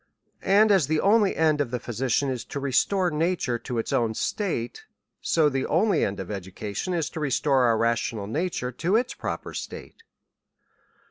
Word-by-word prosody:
And 205 +3 +4
as 190 -9 +4
the 155 +1 +1
only 205 +1 +3
end 155 -2 +2
of 140 - -1
tlie 125 0 -3
physician 130 +4 -1
is 125 -2 -4
to 140 - -5
restore 175 +7 +1
nature 155 -6 0
to 120 +1 -5
its 115 - -2
own 115 -2 +1
state; 140 - -3 0.4
so 160 -2 +3
the 135 -2 -1
only 190 +2 +2
end 100 0 -2
of 95 +1 -6
education 100 - -4
is, 165 -3 0
to - - -6
restore 135 -2 +2
our 115 -2 +3
rational 115 -2 0
nature 145 - -2
to 170 - 0
its 240 +3 +1
proper - - -5
state. - - -8
140 Hz, 175 wpm, -25 LUFS, 120-175 Hz, 0.4 s, And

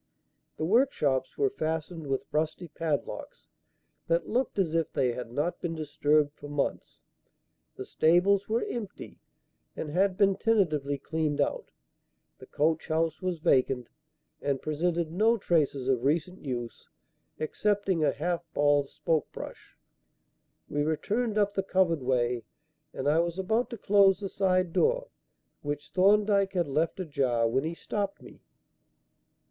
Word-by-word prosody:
The 155 - -1
workshops 155 - +1
were 410 -1 +2
fastened 160 - -3
with 135 -1 -1
rusty 160 +3 -1
padlocks 155 -1 -4 0.6
that 170 +1 +1
looked 245 0 -1
as 175 -5 +1
if 165 -1 0
they 125 -2 +1
had 120 -1 -6
not 155 +7 -2
been 165 -1 -3
disturbed 150 -1 +1
for 145 - -11
months. 145 -1 -3 0.7
The - - -7
stables 190 +5 +3
were 225 +2 +1
empty 210 -5 -7 0.6
and 150 - -5
had 185 +3 +2
been 195 -2 +3
tentatively 155 -11 +1
cleaned 150 +1 -2
out, 140 - -1 0.7
the - - -12
coach 160 +2 0
house 160 +1 0
was 185 -2 -1
vacant, 130 -4 +2 0.5
and 140 -2 0
presented 165 +2 -1
no 220 +6 +3
traces 145 - +1
of 130 -3 +1
recent 165 +6 0
use 120 -4 -5 0.5
excepting 195 +1 0
a 145 - +4
half 170 +4 -2
bald 145 -1 +3
spoke 155 0 -1
brush. - - -10 0.9
We 145 - -1
returned 210 +9 -1
up 205 -1 +2
the 195 - 0
covered 185 -5 +1
way 125 -2 0 0.5
and 135 - -4
I 155 +3 +4
was 170 +1 -1
about 220 +6 0
to 235 - -6
close 195 -2 +4
the 200 -2 -4
side 185 -3 +1
door, - - +2 0.5
which 145 +1 -5
Thorndyke 200 +2 +3
had 175 -4 0
left 155 +6 0
ajar, 130 -9 +1
when 125 +4 0
he 165 +1 -3
stopped 200 +2 -3
me. - - -14
165 Hz, 140 wpm, -28 LUFS, 145-195 Hz, 0.9 s, a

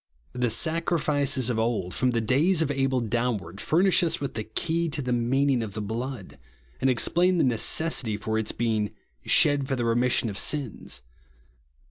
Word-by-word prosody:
The 125 -1 0
sacrifices 145 -3 0
of 110 - -1
old, 110 -6 -1
from 130 - +1
the 115 -2 0
days 155 - +2
of 145 - -1
Abel 135 -2 0
downward, 110 -5 -2
furnish 185 +4 +3
lis 165 -1 0
with 140 - -4
ihi3 110 0 -7
key 170 0 0
to 155 0 -3
the 125 -3 -1
meaning 130 +2 +1
of 105 -4 -6
the - - -3
blood, 110 - -5 0.4
and 135 - +3
explain 175 +9 +2
the - - +3
necessity 120 -1 +1
for 110 +2 -2
its 110 - -1
being 110 -3 -1 0.3
"shed 145 -2 +3
for 135 - -1
the 120 -2 -2
remission 120 +1 +2
of 100 -2 -4
sins." 135 - -3
125 Hz, 170 wpm, -26 LUFS, 110-145 Hz, 0.4 s, furnish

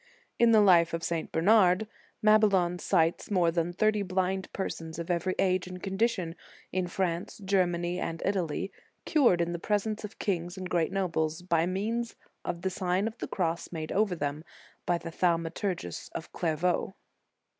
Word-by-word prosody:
* - - -39
In 235 - +6
the 220 -2 +6
life 170 -4 +5
of 165 - -5
St. 165 -1 -2
Bernard, 190 +2 +4 0.4
Mabillon 200 -5 +4
cites 165 -3 +1
more 180 -5 +3
than 170 0 0
thirty 215 +3 +2
blind 190 0 -1
persons 165 -4 -5
of 170 +1 -3
every 175 +2 0
age 185 -1 +1
and 180 0 -8
condition, 195 -4 0 0.4
in 185 -1 -1
France, 175 0 -2
Germany, 180 -2 +1
and 165 0 -3
Italy, 190 -1 -1 0.3
cured 240 - +4
in 170 0 0
the 170 - -3
presence 210 +3 -1
of 210 0 -8
kings 175 -2 -2
and 185 -1 -6
great 165 -2 +1
nobles, 165 -4 -1
by 170 -2 +2
means 225 +5 -2 0.3
of 175 0 -4
the 190 - 0
Sign 185 +2 0
of 225 +1 -7
the - - -4
Cross, 170 -3 -2
made 160 -2 -5
over 200 -2 +2
them 145 -1 -3 0.4
by 175 - +3
the 165 0 -7
Thaumaturgus 170 - -1
of - - -6
Clairvaux. 175 +3 0
180 Hz, 165 wpm, -29 LUFS, 170-195 Hz, 0.4 s, In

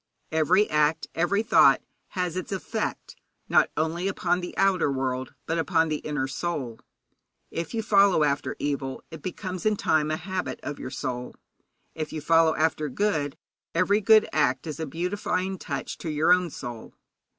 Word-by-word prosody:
Every 170 +6 +3
act, 150 +1 +1
every 175 +6 +1
thought, 225 - +6 0.4
has 180 -2 -1
its 185 - -4
effect, 190 -5 -3 0.3
not - - +4
only 165 +4 0
upon 180 -2 0
the 175 - -7
outer 190 -6 +3
world, 130 -1 -2
but 165 +1 -1
upon 165 -1 +2
the 155 - 0
inner 145 -3 -2
soul. 135 -5 -4 0.7
If 170 +7 -4
you 225 - -1
follow 200 -5 +5
after 140 -1 0
evil, 140 -2 -3
it 160 -2 -9
becomes 185 0 -5
in 215 -1 +3
time 155 -5 +1
a 155 - 0
habit 185 +1 -4
of 145 - -5
your 130 - -5
soul. 125 -1 -4 0.6
If 155 -1 -4
you 155 - -4
follow 165 +1 +4
after 155 -1 0
good, 150 -4 -1 0.4
every 195 +5 +3
good 215 +1 +6
act 130 -4 +1
is 155 0 -5
a 160 - -3
beautifying 185 +3 -2
touch - - -5
to 165 - -4
your 155 +3 +4
own 180 -1 +1
soul. 120 -6 -8
160 Hz, 165 wpm, -26 LUFS, 150-185 Hz, 0.7 s, thought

